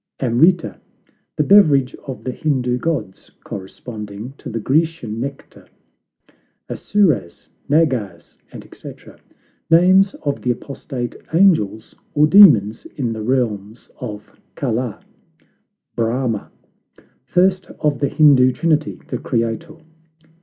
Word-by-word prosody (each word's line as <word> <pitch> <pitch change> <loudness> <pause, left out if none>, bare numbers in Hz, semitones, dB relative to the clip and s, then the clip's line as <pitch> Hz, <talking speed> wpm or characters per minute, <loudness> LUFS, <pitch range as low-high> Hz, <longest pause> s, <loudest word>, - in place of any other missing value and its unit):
AMRITA 160 +8 +2 0.6
The 150 - +1
beverage 145 -8 +4
of 130 - -7
the 130 - -3
Hindoo 125 -4 -1
gods, 120 - -4
corresponding 105 +3 -8
to - - -8
the 115 - -4
Grecian 135 -4 -1
nectar. 140 +3 -8 1.0
ASSOURAS, 155 - -1 0.2
NAGAS, 130 - 0 0.4
&c. - - -10 0.8
Names 185 +4 +5
of 145 -1 -2
the 125 - -2
apostate 125 0 -5 0.2
angels, 155 - +2 0.2
or 150 +1 +5
demons 150 - +6
in 120 -5 -2
the 110 - -6
realms 110 -3 -2
of 105 -4 -8 0.2
Kala. 125 -4 -3 0.9
BRAHMA 115 -1 -2 0.8
First 185 +4 +1
of 150 -2 0
the 140 - 0
Hindoo 135 -4 +5
trinity; 155 -1 -1
the - - -3
Creator. 115 +7 -3
130 Hz, 105 wpm, -19 LUFS, 115-155 Hz, 1.0 s, demons